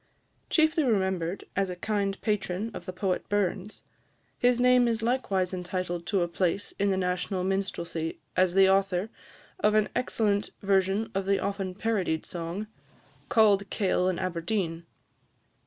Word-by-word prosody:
Chiefly 315 -1 +3
remembered 190 -6 0
as 195 -1 +1
a 180 - -4
kind 200 0 -1
patron 210 0 -1
of - - -8
the - - -2
poet 185 0 -2
Burns, 205 0 -1 0.6
his 245 0 +3
name 250 0 +5
is 225 -1 -1
likewise 200 -7 0
entitled 180 -1 -3
to 195 -3 +2
a - - -1
place 180 +3 -1
in 200 0 +2
the 190 - +1
national 180 +1 -1
minstrelsy 175 -4 -2 0.2
as 185 -1 +3
the 195 0 +7
author 195 +1 +2 0.5
of 215 -10 +3
an 215 -1 +3
excellent 210 -4 0
version 195 +2 +1
of 195 0 -2
the 200 0 +3
often 195 -2 -3
parodied 195 -7 -1
song, 175 +4 -4 0.6
"Cauld 200 -3 +4
Kail 185 -3 +1
in 185 - -1
Aberdeen." 170 -1 -2
195 Hz, 145 wpm, -28 LUFS, 180-210 Hz, 0.6 s, the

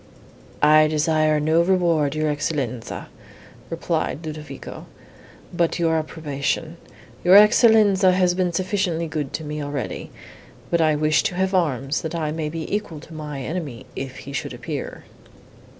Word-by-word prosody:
"I 155 +1 +6
desire 155 0 +2
no 160 +3 +3
reward, 170 -5 +2
your 155 0 0
Excellenza," 135 -5 -3 0.6
replied 160 - -2
Ludovico, 150 -3 -8 0.7
"but 170 -1 +1
your 165 -2 +1
approbation. 155 +1 -3 0.5
Your 180 +2 +6
Excellenza 210 -2 +6
has 180 -1 +3
been 180 -1 0
sufficiently 185 -2 -1
good 155 -3 -4
to 160 - -4
me 150 0 -4
already; 145 -2 -4 0.6
but 170 - +3
I 155 -1 +3
wish 155 +1 +2
to 180 - -2
have 190 +1 0
arms, 145 -6 0
that 160 +1 -4
I 155 -2 -1
may 155 -1 -3
be 160 0 -5
equal 190 -7 -4
to 165 - -13
my 150 -3 -6
enemy, 145 -6 -5
if 130 -1 -6
he 140 - -8
should - - -4
appear." - - -6
155 Hz, 145 wpm, -22 LUFS, 150-175 Hz, 0.7 s, I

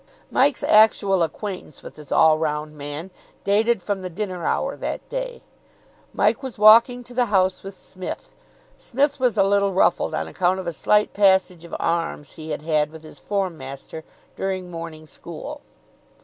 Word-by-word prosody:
Mike's 275 +1 +2
actual 205 -3 +4
acquaintance 175 -1 -4
with - - -10
this 150 -2 -12
all 155 -1 +5
round 150 -1 -2
man 150 +5 -6 0.3
dated 215 0 +2
from 200 -1 -2
the 185 - -5
dinner 185 -1 -4
hour - - -1
that - - -5
day. - - -5 0.7
Mike - - +1
was 265 -4 -6
walking 230 +4 +6
to 245 - -13
the 245 0 +2
house 190 -2 +2
with 195 0 -9
Psmith. 185 -1 -8 0.4
Psmith 280 +3 0
was 245 -4 +1
a 195 - +5
little 200 0 +2
ruffled 180 -1 +2
on - - -2
account 185 +1 0
of 190 - -6
a 170 - -3
slight 210 +5 +2
passage 190 -3 +3
of 170 - -7
arms 165 -4 -2
he 160 0 -10
had 150 - -4
had 155 -2 +1
with 160 0 -13
his 155 - -12
form 195 -5 -2
master 135 +4 -8 0.3
during 185 -2 -3
morning 165 -2 -8
school. 170 - -9
190 Hz, 170 wpm, -23 LUFS, 160-210 Hz, 0.7 s, walking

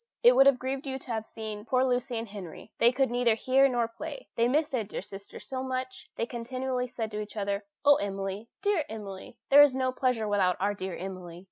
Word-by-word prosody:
It 485 +1 +8
would 270 - +7
have 275 -2 +6
grieved 265 +2 -4
you 265 0 -2
to 265 -2 -9
have 220 -1 -3
seen 215 -2 -7
poor 255 +3 +2
Lucy 250 -1 0
and 225 +1 -4
Henry. 195 -5 -9
They 235 - +6
could 265 -1 +1
neither 240 -2 +2
read 270 +1 +5
nor 240 -2 +1
play, 230 - -8
they 230 +1 +3
missed 300 +4 +1
their 250 -4 0
dear 195 - -6
sister 200 0 -10
so 260 -1 -5
much. 260 +4 -4
They 230 - -1
continually 250 +1 -3
said 225 -2 -4
to 210 - -4
each 210 +1 -9
other, 200 0 -2 0.2
"Oh, 285 0 +7
Emily! 195 +1 -4 0.2
dear 405 -6 +2
Emily! 200 -3 -8
there 285 +1 +10
is 290 -3 +6
no 260 -1 +1
pleasure 250 -4 0
without 195 -3 +2
our 200 +2 +1
dear 190 -2 -5
Emily!" 180 -2 -7
235 Hz, 225 wpm, -29 LUFS, 205-260 Hz, 0.2 s, there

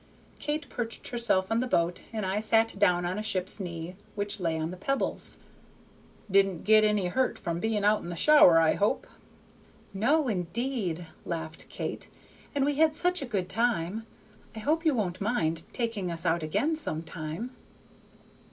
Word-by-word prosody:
Kate 300 +1 -2
perched 230 -2 -5
herself 230 -6 +1
on 225 - +2
the 255 - 0
boat, 170 -5 +1
and 215 -3 -3
I 190 +2 0
sat 225 -1 +2
down 180 -3 +3
on 185 +4 -2
a - - -2
ship's 190 -2 +1
knee 170 -1 -5 0.2
which 205 0 -2
lay 165 -3 0
on 160 +1 -2
the - - -6
pebbles. 275 +9 -1 0.9
"Didn't 195 -3 +3
get 215 0 +6
any 210 -3 +2
hurt 255 +8 0
from 170 0 -3
being 215 0 0
out 210 +1 +4
in - - -7
the 175 - -4
shower, 240 - +7
I 160 -1 +4
hope?" 205 +1 0 0.9
"No, 270 +9 +2
indeed," 195 -2 -2 0.2
laughed 160 -2 -6
Kate, - - -5 0.5
"and 275 -1 +2
we 290 -1 0
had 315 0 +4
such 360 +1 +1
a 275 - -4
good 190 -5 -1
time. 225 -1 -1 0.5
I - - -5
hope 320 +6 0
you 310 -4 +4
won't 185 -5 -2
mind 165 -7 0
taking 225 -7 -2
us 170 +1 -3
out 170 0 +2
again 280 - 0
some 165 - -2
time." 165 +8 -6
205 Hz, 170 wpm, -28 LUFS, 175-240 Hz, 0.9 s, shower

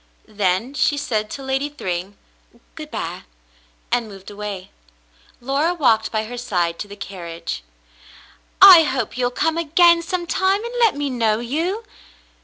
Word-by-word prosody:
Then 205 +4 -1
she 290 0 +1
said 215 -6 -2
to 275 - -7
Lady 270 +2 -1
Thryng, 190 - -5 0.6
"Good - - -9
by," - - -5 0.7
and 240 -2 +1
moved 195 -1 -11
away. 205 -2 -7 0.7
Laura 280 +7 0
walked 225 -9 +2
by 215 -1 -1
her 245 +2 -7
side 175 -8 -1
to 205 - -5
the 205 - -10
carriage. 170 - -7 1.0
"I 375 -3 +11
hope 260 -6 -2
you'll 250 -1 0
come 320 +6 -1
again 335 +1 +4
sometime, 375 +4 -1
and 475 - -6
let 455 -7 +4
me 285 -1 -2
know 225 -3 +1
you." 330 - -2
245 Hz, 145 wpm, -21 LUFS, 205-320 Hz, 1.0 s, I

